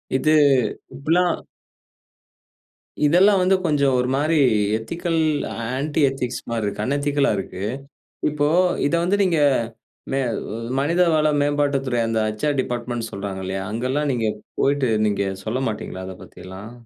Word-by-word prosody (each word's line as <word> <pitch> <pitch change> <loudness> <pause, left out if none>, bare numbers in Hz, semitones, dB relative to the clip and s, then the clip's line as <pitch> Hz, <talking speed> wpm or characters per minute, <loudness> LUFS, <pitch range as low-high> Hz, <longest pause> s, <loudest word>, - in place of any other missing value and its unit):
இது 155 +4 +3 0.6
இப்படிலாம் 170 +5 +1 1.7
இதெல்லாம் 190 +6 +5
வந்து 185 +1 +4
கொஞ்சம் 140 -4 +2
ஒருமாரி 135 +6 +1 0.4
எத்திக்கல் 170 +8 -2 0.6
ஆன்டி 145 +3 -2
எத்திக்ஸ் 130 -2 -4
மாரி 115 -2 -1
இருக்கு. 100 +1 -3
அன் 140 - 0
எதிக்கல் 145 0 +1
ஆ - - +3
இருக்கு. 95 -1 -6 0.7
இப்போ 145 0 +1 0.4
இத 155 - 0
வந்து 190 +3 +2
நீங்க 170 -3 +1 0.7
மே 135 - +1
அ - - -2 0.5
மனிதவள 160 0 +3
மேம்பாட்டு 145 -1 +1
துறை 120 -2 0
அந்த 115 0 0
ஹெச்.ஆர் 140 +7 -1
டிபார்ட்மென்ட்னு 120 -2 -4
சொல்றாங்க 100 -1 -5
இல்லயா! 95 +1 -3
அங்கலாம் 130 +6 -1
நீங்க 115 -3 -1 0.3
போயிட்டு 140 -2 +2 0.2
நீங்க 100 -1 0 0.2
சொல்ல 115 +4 -2
மாட்டீங்களா! 95 -3 -5
அத 95 - -7
பத்திலாம். 95 +5 -10
135 Hz, 130 wpm, -22 LUFS, 115-155 Hz, 1.7 s, இதெல்லாம்